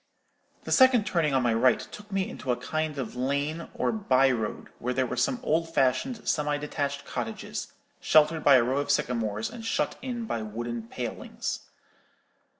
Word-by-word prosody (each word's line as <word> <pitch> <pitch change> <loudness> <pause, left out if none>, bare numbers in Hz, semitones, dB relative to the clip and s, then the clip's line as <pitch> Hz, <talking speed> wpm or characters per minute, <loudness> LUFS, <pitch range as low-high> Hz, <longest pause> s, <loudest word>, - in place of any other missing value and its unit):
The - - -6
second 260 -5 +6
turning 155 -8 +1
on 130 - +3
my 120 -2 +2
right 120 +2 +4
took 210 0 -10
me 195 -1 0
into 130 - -4
a - - +2
kind 155 -1 -2
of 125 -4 -4
lane 140 +6 -1
or - - +1
by 135 - +3
road, 110 -4 -3
where 125 +1 -2
there 130 - +2
were - - -3
some 260 -3 +1
old 165 -2 +1
fashioned, 140 - +1
semi 150 -1 +1
detached 140 -1 -3
cottages, - - -5 0.3
sheltered 155 +1 +4
by 140 - +7
a 125 - +6
row 130 +4 0
of 145 - -3
sycamores, 110 -3 0
and 235 -1 -8
shut 225 - -1
in 240 -2 -4
by 115 - -2
wooden 115 +1 -5
palings. - - -4
140 Hz, 175 wpm, -27 LUFS, 125-165 Hz, 0.3 s, by